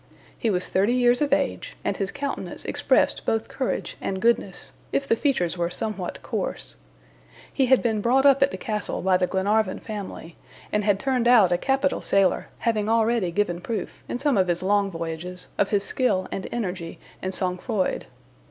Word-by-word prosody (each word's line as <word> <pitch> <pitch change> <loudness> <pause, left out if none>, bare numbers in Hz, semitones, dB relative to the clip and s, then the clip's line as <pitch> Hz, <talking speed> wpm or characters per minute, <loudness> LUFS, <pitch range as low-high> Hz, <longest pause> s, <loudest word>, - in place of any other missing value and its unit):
He 230 - -1
was 180 -3 +1
thirty 200 +6 +2
years 245 +1 +3
of 290 -2 +1
age, 290 - -1
and - - 0
his 195 -1 -2
countenance 280 0 -5
expressed - - +2
both 225 0 0
courage 260 - -3
and 190 - -2
goodness, 235 +3 0 0.2
if 275 - 0
the - - +3
features 185 - 0
were 170 0 +1
somewhat 195 0 -4
coarse. - - -3 0.8
He 265 - +2
had 260 0 +4
been 220 -3 +1
brought 260 +5 +3
up 275 -1 +6
at 275 - +5
the - - -6
castle 210 -4 -3
by 185 -1 +4
the 180 0 +1
Glenarvan 195 +1 +1
family, 200 -6 -7 0.4
and 210 - +2
had 200 -1 +2
turned 255 -2 +1
out 220 -7 +6
a - - +4
capital 270 +3 +1
sailor, 195 -2 +2
having 220 -3 0
already 225 -3 +2
given 175 -1 -1
proof, 220 +4 -5
in - - -2
some 275 -4 +2
of 185 - +3
his 175 0 0
long 200 +1 +2
voyages, 170 +1 -5
of 200 - +3
his 200 -2 +1
skill 200 -6 +1
and 190 - -4
energy 180 -7 -4 0.2
and 185 - -2
sang 185 -1 -1
froid. 215 -5 -1
210 Hz, 185 wpm, -25 LUFS, 185-245 Hz, 0.8 s, up